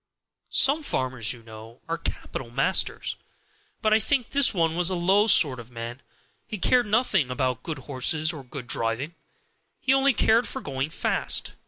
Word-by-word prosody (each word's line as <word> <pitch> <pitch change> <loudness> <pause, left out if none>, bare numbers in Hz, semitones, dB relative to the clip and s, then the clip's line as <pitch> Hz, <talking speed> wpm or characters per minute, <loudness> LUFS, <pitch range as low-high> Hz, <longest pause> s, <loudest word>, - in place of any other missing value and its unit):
"Some 285 +4 +5
farmers, 130 - 0
you 120 -2 -10
know, 110 +1 -12
are 165 0 -3
capital 130 -6 -6
masters; 135 +10 0 0.7
but 215 0 +3
I 220 - +5
think 245 +2 -1
this 280 -1 +4
one 165 -4 0
was 175 0 +4
a 185 - -1
low 190 +5 +3
sort 145 - +4
of 120 0 -11
man. 120 +2 -7 0.5
He 215 - -5
cared 245 +5 +2
nothing 210 - +1
about 125 -1 -2
good 160 0 -5
horses 150 +5 0
or 145 -4 -9
good 130 0 -9
driving; 120 +6 -2 0.7
he 265 - +2
only 270 0 +3
cared 230 +1 +3
for 265 - -4
going 135 - -4
fast. - - -1
155 Hz, 170 wpm, -25 LUFS, -, 0.7 s, Some